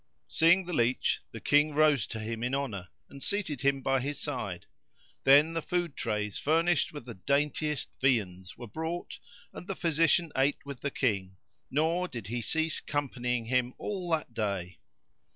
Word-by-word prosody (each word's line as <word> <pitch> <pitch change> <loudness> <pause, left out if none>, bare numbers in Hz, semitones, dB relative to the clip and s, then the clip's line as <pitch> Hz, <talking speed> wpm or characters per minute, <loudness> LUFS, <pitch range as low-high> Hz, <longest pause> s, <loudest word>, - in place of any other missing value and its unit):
Seeing 175 +3 +4
the 180 - -5
leach 120 -2 +1
the - - -7
King 150 +1 +3
rose 150 -7 +4
to - - -4
him 110 +1 -4
in 125 +3 0
honour 110 -10 -3 0.2
and 140 - -12
seated 175 - -1
him 135 -1 +2
by 135 0 +2
his 140 +3 -3
side; 115 - -4 0.6
then 145 +4 +7
the 165 - -1
food 175 -2 -1
trays 105 -3 -2
furnished 165 +1 +2
with 145 -5 -8
the 120 - -7
daintiest 145 - -1
viands 95 -8 0
were 120 - -7
brought 160 +8 -5 0.3
and 180 - -9
the 195 - -3
physician 165 0 +2
ate 135 +2 +1
with 140 -3 -7
the 140 - -2
King, 100 -9 -1 0.3
nor 165 +5 +1
did 120 - -7
he 120 +5 -3
cease 160 +5 0
companying 125 -5 -2
him 125 +1 0
all 185 -4 -4
that 155 -7 -1
day. 100 -6 -3
140 Hz, 170 wpm, -30 LUFS, 115-160 Hz, 0.6 s, then